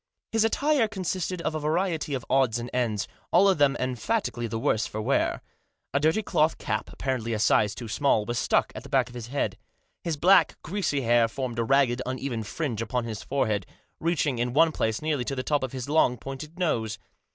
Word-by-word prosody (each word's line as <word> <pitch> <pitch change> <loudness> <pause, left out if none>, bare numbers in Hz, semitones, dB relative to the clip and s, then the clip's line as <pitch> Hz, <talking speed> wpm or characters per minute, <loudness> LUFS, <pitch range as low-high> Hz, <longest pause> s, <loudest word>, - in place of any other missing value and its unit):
His 225 -1 +3
attire 270 +2 +2
consisted 185 -3 -3
of 155 - -1
a 155 - -2
variety 160 -1 0
of 125 - -5
odds 130 -4 +2
and 120 +1 -6
ends, 115 -5 0 0.2
all 190 +3 +6
of 190 -5 +3
them 145 -1 +4
emphatically 130 - -1
the 115 - -3
worse 110 -1 +1
for 110 - -5
wear. 110 - 0 0.5
A 140 - +3
dirty 160 +9 +2
cloth 160 -4 +2
cap, - - -3
apparently 125 -4 -2
a - - 0
size 105 -1 +3
too 120 - -7
small, 110 -2 +2
was 120 +1 -2
stuck - - +2
at - - -7
the 140 - -12
back 130 -3 +2
of - - -13
his 120 -2 -7
head. 140 +3 -2 0.4
His 165 -3 -2
black, 185 +6 +5
greasy 165 -5 -1
hair 120 -1 +4
formed 120 0 -4
a - - +2
ragged, 130 0 +3
uneven 130 -2 -3
fringe 115 +1 -3
upon 125 +1 -1
his 110 -2 -5
forehead, 110 -8 -1 0.3
reaching 155 -6 0
in 120 0 -1
one 160 +3 +5
place 110 -3 -1
nearly 150 -5 0
to 135 - -3
the 130 - -3
top 145 +1 +1
of 130 -2 -3
his 130 -1 -5
long, 145 -4 +3
pointed 135 +7 -8
nose. 115 - 0
135 Hz, 210 wpm, -27 LUFS, 120-160 Hz, 0.5 s, all